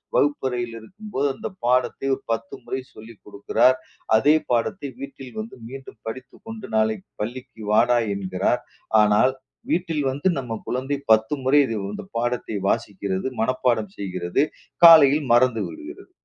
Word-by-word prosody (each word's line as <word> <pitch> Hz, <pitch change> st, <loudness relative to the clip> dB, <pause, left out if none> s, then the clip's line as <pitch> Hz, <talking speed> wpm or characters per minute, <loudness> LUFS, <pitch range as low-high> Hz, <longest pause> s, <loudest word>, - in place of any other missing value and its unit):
வகுப்பறையில் 125 Hz, -5 st, 0 dB
இருக்கும்போது 185 Hz, -, -4 dB
அந்தப் 190 Hz, +6 st, -8 dB
பாடத்தை 125 Hz, +2 st, +1 dB
ஒரு -, -, -15 dB
10 115 Hz, 0 st, -5 dB
முறை 130 Hz, -, -4 dB
சொல்லிக்கொடுக்கிறார். 110 Hz, +3 st, 0 dB, 0.4 s
அதே 145 Hz, +7 st, +5 dB, 0.2 s
பாடத்தை 140 Hz, -, 0 dB
வீட்டில் 135 Hz, -2 st, -9 dB
வந்து 220 Hz, +1 st, -6 dB
மீண்டும் 135 Hz, -4 st, -11 dB
படித்துக்கொண்டு 220 Hz, -, -8 dB
நாளைக்குப் 110 Hz, -2 st, -1 dB
பள்ளிக்கு 120 Hz, +1 st, -6 dB
வாடா 120 Hz, +3 st, +4 dB, 0.2 s
என்கிறார். 95 Hz, +4 st, -1 dB, 0.4 s
ஆனால் 105 Hz, +5 st, +4 dB, 0.4 s
வீட்டில் 165 Hz, -4 st, 0 dB
வந்து 145 Hz, +7 st, -2 dB
நம்ம 125 Hz, -4 st, -5 dB
குழந்தை 135 Hz, +3 st, -2 dB
10 110 Hz, +3 st, +4 dB
முறை 135 Hz, +3 st, +5 dB, 0.3 s
இந்தப் 190 Hz, -, -9 dB
பாடத்தை 120 Hz, -2 st, -2 dB
வாசிக்கிறது, 95 Hz, +1 st, -2 dB
மனப்பாடம் 115 Hz, -4 st, 0 dB
செய்கிறது, 90 Hz, +1 st, -1 dB, 0.4 s
காலையில் 150 Hz, -3 st, +8 dB
மறந்துவிடுகிறது. 315 Hz, -, 0 dB
125 Hz, 120 wpm, -23 LUFS, 110-145 Hz, 0.4 s, காலையில்